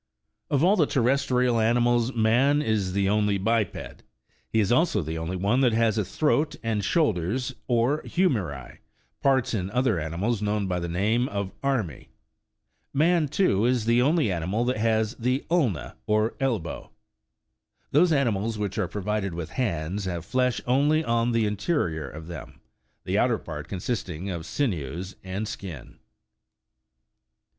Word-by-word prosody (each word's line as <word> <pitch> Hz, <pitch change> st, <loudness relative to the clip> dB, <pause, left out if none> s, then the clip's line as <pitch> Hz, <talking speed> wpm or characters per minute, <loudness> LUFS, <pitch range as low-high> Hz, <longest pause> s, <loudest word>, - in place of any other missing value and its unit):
Of 145 Hz, +1 st, +2 dB
all 190 Hz, +4 st, +5 dB
the 155 Hz, -5 st, +3 dB
terrestrial 125 Hz, -1 st, +2 dB
animals, 120 Hz, +1 st, +2 dB
man 120 Hz, +6 st, +3 dB
is 105 Hz, -7 st, 0 dB
the 100 Hz, 0 st, +1 dB
only 105 Hz, 0 st, +2 dB
biped: 110 Hz, 0 st, -1 dB, 0.5 s
he 110 Hz, -, +1 dB
is 105 Hz, 0 st, +2 dB
also 125 Hz, -, +2 dB
the 80 Hz, +1 st, -4 dB
only 80 Hz, +3 st, -3 dB
one 100 Hz, +8 st, +1 dB
that 125 Hz, -4 st, +3 dB
has 115 Hz, -1 st, +2 dB
a -, -, +1 dB
throat, 150 Hz, -, 0 dB
and 110 Hz, -3 st, -1 dB
shoulders, 125 Hz, -, 0 dB
or 125 Hz, +5 st, +2 dB
" -, -, -12 dB
hu 185 Hz, +2 st, +4 dB
meri," 85 Hz, -, -3 dB, 0.4 s
parts 130 Hz, -2 st, +2 dB
in 95 Hz, -4 st, -1 dB
other 120 Hz, -4 st, +1 dB
animals 90 Hz, +8 st, -2 dB
known 105 Hz, -1 st, 0 dB
by 90 Hz, -1 st, -1 dB
the 85 Hz, 0 st, -4 dB
name 110 Hz, +8 st, +1 dB
of 100 Hz, -1 st, -3 dB
" -, -, -36 dB
armi." 120 Hz, -, -1 dB, 0.8 s
Man, 160 Hz, +2 st, +3 dB
too, 140 Hz, -, +2 dB
is 125 Hz, -3 st, +1 dB
the 120 Hz, +1 st, +4 dB
only 145 Hz, -, +2 dB
animal 90 Hz, +7 st, -1 dB
that 125 Hz, 0 st, 0 dB
has 110 Hz, 0 st, +1 dB
the 125 Hz, +3 st, -1 dB
" -, -, -26 dB
ulna," 130 Hz, -, 0 dB
or 110 Hz, +1 st, +2 dB
elbow. 115 Hz, -, -2 dB, 1.0 s
Those 165 Hz, +5 st, +4 dB
animals 115 Hz, -6 st, +1 dB
which 105 Hz, 0 st, -3 dB
are 100 Hz, -, 0 dB
provided 100 Hz, -1 st, -2 dB
with 85 Hz, -1 st, -5 dB
hands, 95 Hz, -, -2 dB
have 85 Hz, -3 st, -4 dB
flesh 125 Hz, +4 st, +1 dB
only 145 Hz, +5 st, +3 dB
on 115 Hz, -2 st, +1 dB
the 115 Hz, -2 st, +2 dB
interior 100 Hz, -, -1 dB
of 80 Hz, +5 st, -9 dB
them, 85 Hz, -2 st, -9 dB, 0.4 s
the -, -, 0 dB
outer -, -, +2 dB
part -, -, -7 dB
consisting 95 Hz, -3 st, -4 dB
of 85 Hz, -2 st, -5 dB
sinews 90 Hz, -, -2 dB
and 95 Hz, +3 st, -4 dB
skin. 85 Hz, -12 st, -8 dB
110 Hz, 160 wpm, -26 LUFS, 95-130 Hz, 1.0 s, all